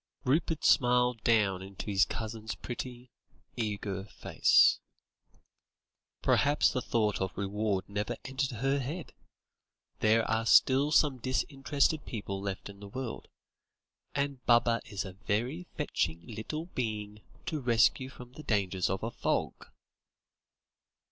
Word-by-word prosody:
Rupert 155 Hz, +3 st, +1 dB
smiled 125 Hz, -2 st, +4 dB
down 100 Hz, -5 st, +3 dB
into 95 Hz, 0 st, -8 dB
his 100 Hz, -2 st, +3 dB
cousin's 110 Hz, -1 st, -5 dB
pretty, 125 Hz, 0 st, -7 dB, 0.4 s
eager 100 Hz, -3 st, -3 dB
face. -, -, +4 dB, 1.4 s
"Perhaps 145 Hz, +1 st, +3 dB
the 130 Hz, -, -1 dB
thought 110 Hz, -4 st, 0 dB
of 95 Hz, -, -3 dB
reward 100 Hz, 0 st, -1 dB
never 105 Hz, +1 st, -3 dB
entered 135 Hz, 0 st, -1 dB
her 135 Hz, +4 st, 0 dB
head? 150 Hz, +6 st, -5 dB, 0.9 s
There 110 Hz, +1 st, +3 dB
are 115 Hz, +1 st, 0 dB
still 135 Hz, +5 st, +5 dB
some 145 Hz, -4 st, +3 dB
disinterested 140 Hz, +4 st, 0 dB
people 100 Hz, -4 st, -4 dB
left 100 Hz, -1 st, -4 dB
in 100 Hz, -1 st, -11 dB
the 100 Hz, -, -9 dB
world. 125 Hz, +2 st, -6 dB, 0.9 s
And 140 Hz, -2 st, -2 dB
Baba 120 Hz, -1 st, +4 dB
is 100 Hz, -1 st, -4 dB
a 95 Hz, -, -8 dB
very 115 Hz, -, -2 dB
fetching 85 Hz, -, -1 dB
little 115 Hz, +9 st, -5 dB
being 105 Hz, -, -4 dB, 0.2 s
to 155 Hz, -, -2 dB
rescue 125 Hz, +2 st, +3 dB
from 125 Hz, -2 st, -12 dB
the 155 Hz, -, -10 dB
dangers 95 Hz, -7 st, 0 dB
of 95 Hz, +2 st, -2 dB
a 115 Hz, -, -2 dB
fog." -, -, -2 dB
115 Hz, 125 wpm, -30 LUFS, 105-130 Hz, 1.4 s, still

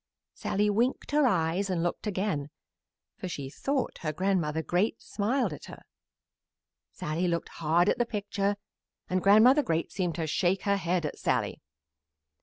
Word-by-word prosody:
Sallie 210 Hz, +1 st, 0 dB
winked 240 Hz, +8 st, 0 dB
her 295 Hz, -2 st, +4 dB
eyes 185 Hz, -1 st, +1 dB
and 175 Hz, -3 st, 0 dB
looked 175 Hz, +5 st, -2 dB
again, 185 Hz, -8 st, -1 dB, 0.7 s
for -, -, -5 dB
she 140 Hz, -6 st, -5 dB
thought 275 Hz, -, -2 dB
her 155 Hz, -, -2 dB
Grandmother 160 Hz, -2 st, 0 dB
Great 190 Hz, +8 st, 0 dB
smiled 225 Hz, -, -1 dB
at 150 Hz, -, -9 dB
her. -, -, -11 dB, 1.1 s
Sallie 160 Hz, +4 st, -2 dB
looked 170 Hz, -1 st, -1 dB
hard 165 Hz, +3 st, +3 dB
at 245 Hz, -, +2 dB
the 240 Hz, -, +3 dB
picture, 205 Hz, -2 st, -1 dB, 0.6 s
and 185 Hz, 0 st, +1 dB
Grandmother 220 Hz, +9 st, +6 dB
Great 165 Hz, -, -1 dB
seemed 180 Hz, -4 st, -2 dB
to 165 Hz, -1 st, -2 dB
shake 180 Hz, +4 st, +1 dB
her 200 Hz, -1 st, +2 dB
head 175 Hz, -2 st, 0 dB
at 150 Hz, -, -5 dB
Sallie. -, -, -1 dB
185 Hz, 155 wpm, -29 LUFS, 165-210 Hz, 1.1 s, Grandmother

